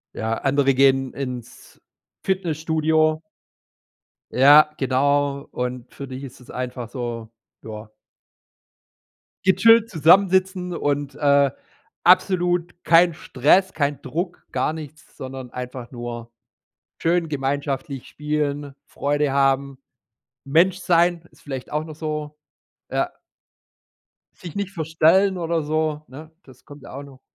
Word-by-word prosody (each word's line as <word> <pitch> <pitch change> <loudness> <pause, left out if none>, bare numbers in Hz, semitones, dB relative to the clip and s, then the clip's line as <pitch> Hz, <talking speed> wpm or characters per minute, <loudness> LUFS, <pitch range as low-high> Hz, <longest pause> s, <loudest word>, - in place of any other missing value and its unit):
Ja, 110 0 -2
andere 135 0 +2
gehen 135 0 +3
ins 125 -4 -8 0.4
Fitnessstudio. 160 -3 +1 1.1
Ja, 145 +4 +7
genau. 140 +1 +1
Und 125 0 -5
für 140 - -8
dich 130 +1 -8
ist 130 -4 -10
es 125 - -14
einfach 125 -1 -5
so, 115 -2 -6 0.3
ja 110 0 -9 1.6
gechillt 225 +4 +5
zusammensitzen 185 +1 +3
und, 145 -2 -2
äh, 140 -2 +3 0.5
absolut 175 -1 +2
kein 170 +1 +5
Stress, 155 +7 +2
kein 145 -2 -1
Druck, 170 +7 -5
gar - - 0
nichts, 155 -1 -11
sondern 130 -1 -7
einfach 125 -1 -7
nur 120 -1 -7 0.7
schön 170 0 +1
gemeinschaftlich 140 -1 -3
spielen, 145 -1 -3
Freude 145 0 -1
haben, 135 0 +1 0.7
Mensch 170 +6 +3
sein, 175 -1 +2
ist - - -23
vielleicht 135 -3 -7
auch 150 +1 -1
noch 155 -1 -9
so, 150 -1 -5 0.5
ja. - - 0 1.2
Sich 170 -4 -10
nicht 200 -1 -3
verstellen 170 +3 +2
oder 165 -2 -1
so, 155 0 -1
ne? 155 +5 -12
Das 130 -2 -18
kommt 145 -1 -13
ja - - -11
auch 140 +2 -7
noch 135 -2 -15
145 Hz, 115 wpm, -22 LUFS, 135-165 Hz, 1.6 s, Ja